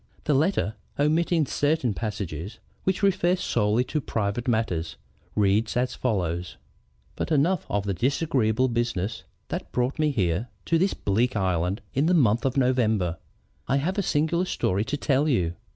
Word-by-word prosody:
The 150 - +1
letter, 145 - +1 0.2
omitting 160 +2 +2
certain 145 -4 +1
passages 100 -3 -5 0.3
which 190 +1 0
refer 185 -2 +3
solely 115 - +1
to 150 +4 -2
private 110 +1 -2
matters, 90 - 0 0.4
reads 105 +3 +2
as 125 +1 0
follows: 90 -7 -2 0.6
"But - - -3
enough 160 +4 +2
of 100 -1 0
the 100 -1 -1
disagreeable 130 - +1
business 115 -4 -2 0.2
that - - -5
brought 125 +4 -1
me 155 -1 +3
here 100 - 0 0.2
to 165 - +2
this 190 +3 +1
bleak 115 +5 0
island 95 0 0
in 140 +4 +2
the 180 - +4
month 120 -4 +3
of 135 +1 0
November. 110 -10 +1 0.5
I 135 - +2
have 180 +8 -1
a - - +3
singular 170 +1 +1
story 100 - 0
to 145 - -2
tell 145 +1 +1
you. 90 - +1
120 Hz, 155 wpm, -26 LUFS, 100-150 Hz, 0.6 s, the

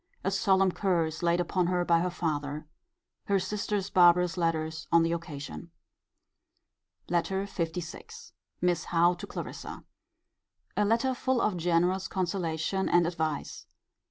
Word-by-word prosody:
A 195 - 0
solemn 190 -1 +3
curse 170 -5 0
laid 170 0 +2
upon 180 0 0
her 180 0 +1
by 170 -1 +4
her 180 +2 0
father. 150 -4 -3 0.6
Her 200 - +2
sister's 205 0 -2
barbarous 175 -1 +5
letters 160 -2 -1
on 170 0 +6
the 165 - +1
occasion. 145 - -6 1.4
LETTER 190 +3 0
LVI. 180 - -6 0.3
Miss 175 -2 +1
Howe 175 +1 +3
to 175 - -8
Clarissa. - - -7 0.9
A 210 - +2
letter 235 +5 +2
full 255 0 0
of 210 -4 +1
generous 175 +2 +1
consolation 180 0 -1
and 175 -1 +4
advice. 160 -4 -3
175 Hz, 130 wpm, -29 LUFS, 165-190 Hz, 1.4 s, on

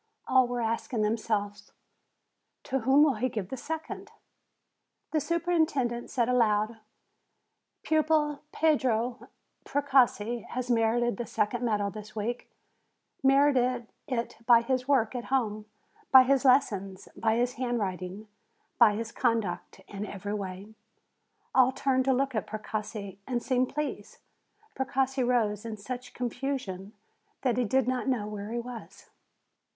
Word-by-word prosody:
All 255 -1 +4
were 245 0 -2
asking 225 0 -1
themselves, 210 -2 -2 0.9
"To 270 -1 -1
whom 265 +4 +5
will 295 -3 +4
he 255 - +2
give 210 -5 -4
the - - -4
second?" 315 +5 -6 1.0
The 315 - +2
superintendent 320 -8 0
said 240 -3 +1
aloud: 220 -2 +2 1.0
"Pupil 310 -2 +2
Pietro 255 -6 +1 0.3
Precossi 250 -5 +2
has 250 0 -3
merited 235 -1 +2
the 240 - -4
second 240 +3 -1
medal 205 -4 0
this 215 +1 -10
week, 230 +3 -3 0.7
merited 265 -3 +3 0.2
it 240 -4 -3
by 235 -2 +7
his 255 +1 -1
work 260 -6 +2
at 245 -2 -4
home, 215 -5 -1 0.4
by 260 -1 +10
his 270 0 +2
lessons, 200 -8 +2
by 225 -1 +1
his 245 +1 +1
handwriting, 210 -5 -3 0.5
by 220 -4 +6
his 225 +1 -4
conduct 230 -7 -1
in 200 0 -6
every 205 +1 -5
way." 200 +1 -6 0.8
All 260 0 +5
turned 260 -1 +1
to 265 - +3
look 265 +1 0
at 215 - -2
Precossi, 210 -2 -5
and 245 -2 -1
seemed 255 -1 +1
pleased. 300 -1 -4 0.6
Precossi 265 0 0
rose 225 -4 +1
in 225 -2 -5
such 250 +4 -7
confusion 245 -6 -4 0.5
that 250 -3 +1
he 250 - +2
did 260 +2 +1
not 255 0 -1
know 250 -6 0
where 210 0 -6
he 235 - -2
was. 240 -1 -8
240 Hz, 135 wpm, -28 LUFS, 215-260 Hz, 1.0 s, by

